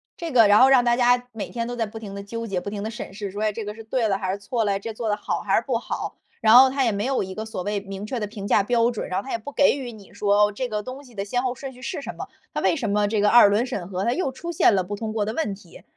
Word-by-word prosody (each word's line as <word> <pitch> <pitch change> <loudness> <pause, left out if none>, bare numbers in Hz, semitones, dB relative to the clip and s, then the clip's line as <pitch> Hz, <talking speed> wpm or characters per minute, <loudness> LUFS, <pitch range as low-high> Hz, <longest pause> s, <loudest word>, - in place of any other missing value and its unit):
这 335 -2 -5
个 230 -4 +6
然 205 +3 +6
后 265 - +7
让 255 -3 +5
大 240 - +4
家 245 0 +3
每 220 - -5
天 235 -1 -3
都 245 - -4
在 230 -2 -1
不 220 +1 -9
停 200 -3 -8
地 200 - -6
纠 230 +2 -5
结， 185 -3 -2
不 200 - -5
停 205 0 -5
地 220 - -3
审 215 -3 -7
视， 200 0 -5
说， 205 +2 -6
哎， 215 - +2
这 215 +1 -6
个 210 +1 -6
是 225 - -10
对 225 +1 0
的 195 -2 +1
还 190 -2 -2
是 200 - -3
错 230 +3 -1
了， 200 -2 0
这 225 +2 -6
做 225 0 -3
得 210 - +1
好 - - -3
还 - - +2
是 - - +1
不 - - +1
好， - - -5 0.2
然 220 +1 +6
后 265 +1 +9
他 265 0 0
也 225 - +1
没 200 - -2
有 265 -4 0
一 190 0 -7
个 220 - -4
所 220 -4 -5
谓 205 0 -2
明 195 +1 -7
确 240 +1 -4
的 - - 0
评 205 -1 -7
价 205 - +4
标 235 +2 +2
准， 235 -3 -5
然 185 - 0
后 - - -17
他 270 - -6
也 - - +1
不 230 +6 -9
给 285 0 +4
予 250 -3 -6
你 210 -3 -15
说 205 0 +3
这 250 +4 -3
个 210 -1 -2
东 255 +5 -8
西 250 -3 -17
的 200 -2 -4
先 245 +5 -1
后 250 - 0
顺 265 +1 -8
序 250 - -15
是 285 - -4
什 - - -7
么， - - -7 0.2
他 - - -2
为 - - +2
什 230 -6 -2
么 205 0 +2
这 215 0 0
个 205 0 +4
二 235 -4 +8
轮 210 +4 +2
审 200 -9 -5
核 190 +1 -2
它 235 - +2
又 295 -5 -1
出 340 +6 -6
现 265 - +4
了 185 -2 +1
不 205 - -4
通 215 +1 -4
过 215 -2 0
的 220 - -3
问 240 -7 -1
题， 180 -4 -16
220 Hz, 370 characters per minute, -24 LUFS, 205-245 Hz, 0.2 s, 后